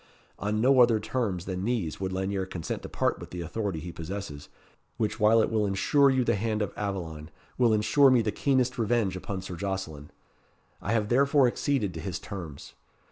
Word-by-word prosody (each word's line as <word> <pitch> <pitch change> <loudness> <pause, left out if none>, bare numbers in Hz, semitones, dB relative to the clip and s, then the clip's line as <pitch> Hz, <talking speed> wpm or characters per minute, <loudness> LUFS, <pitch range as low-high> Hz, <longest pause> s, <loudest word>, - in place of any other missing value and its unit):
On 105 +1 -1
no 130 +3 +4
other 120 -3 +5
terms 105 -8 -2
than 95 -1 -4
these 110 -8 -2
would 95 -1 -2
Lanyere 95 0 -2
consent 85 -4 -5
to - - -8
part - - 0
with - - -9
the 90 - -6
authority 95 +1 -3
he 85 +3 -7
possesses, 85 -3 -7 0.5
which 110 -1 -1
while 110 +1 +5
it - - -1
will 110 -1 +1
ensure 140 +9 +3
you 130 -1 +2
the - - +2
hand 110 +1 -1
of 100 - -5
Aveline, 85 -6 -4 0.3
will 120 -2 +4
ensure 110 +6 +4
me 125 -3 +4
the 105 - 0
keenest 130 -1 +1
revenge 110 -4 +1
upon 95 0 -5
Sir 90 -1 -6
Jocelyn. 90 -6 -4 0.7
I 100 - -2
have 105 -2 0
therefore 140 +2 +4
acceded 120 -6 -1
to 80 - -6
his 85 +2 -4
terms. 85 -9 -8
100 Hz, 190 wpm, -28 LUFS, 90-120 Hz, 0.7 s, other